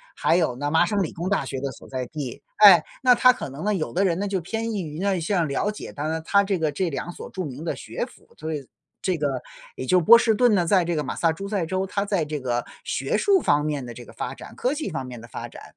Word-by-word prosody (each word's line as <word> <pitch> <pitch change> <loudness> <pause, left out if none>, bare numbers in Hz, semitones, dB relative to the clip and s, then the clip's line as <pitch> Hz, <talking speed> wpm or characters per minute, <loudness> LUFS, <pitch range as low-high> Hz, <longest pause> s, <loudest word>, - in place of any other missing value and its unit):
还 170 - +2
有 160 -8 +1
呢， 145 +3 -2
麻 160 +2 +4
省 200 +1 0
理 160 - -4
工 175 +3 -3
大 195 -9 +1
学 135 0 -4
的 140 0 -3
所 - - -13
在 130 -1 -3
地。 145 -3 -6 0.2
诶， 185 -6 +10 0.2
那 250 - +7
他 250 +1 +6
可 245 - -6
能 145 +8 -7
呢， 210 - +2
有 160 -5 -2
的 195 +3 +2
人 175 -2 +1
呢， 205 - -1
就 195 -2 -1
偏 225 +6 -3
易 205 -3 -2
于 155 -2 -6
呢， 195 -1 +1
像 175 0 +1
了 140 +8 0
解 210 - -8
它 145 - -5
呢 160 0 -2
它 200 +4 +4
这 195 -2 0
个 155 -2 0
这 175 +5 -1
2 140 +3 -4
所 - - -9
著 185 - -4
名 145 +4 -7
的 - - -1
学 - - -4
府， - - -20
所 160 +1 -4
以 140 -3 -5 0.4
这 185 -3 0
个 145 - 0 0.5
也 130 - -5
就 180 +7 +4
波 225 +8 +8
士 230 -1 +3
顿 235 0 +4
呢， 175 -3 +2
在 185 +1 +4
这 170 -1 -1
个 150 - 0
马 - - -4
萨 165 -1 +3
诸 195 +5 -6
塞 200 -4 0
州， 190 +3 -1
他 200 +1 -1
在 195 -6 0
这 150 0 -4
个 120 -2 -2 0.2
学 485 0 -1
术 400 -2 +4
方 145 0 +2
面 145 -4 -2
的 120 - -7
这 120 - -10
个 - - -13
发 - - -4
展、 - - -12
科 255 +3 0
技 305 -7 -3
方 145 -6 -4
面 125 -2 -8
的 115 - -11
发 - - -6
展。 - - -12
170 Hz, 310 characters per minute, -24 LUFS, 145-200 Hz, 0.5 s, 诶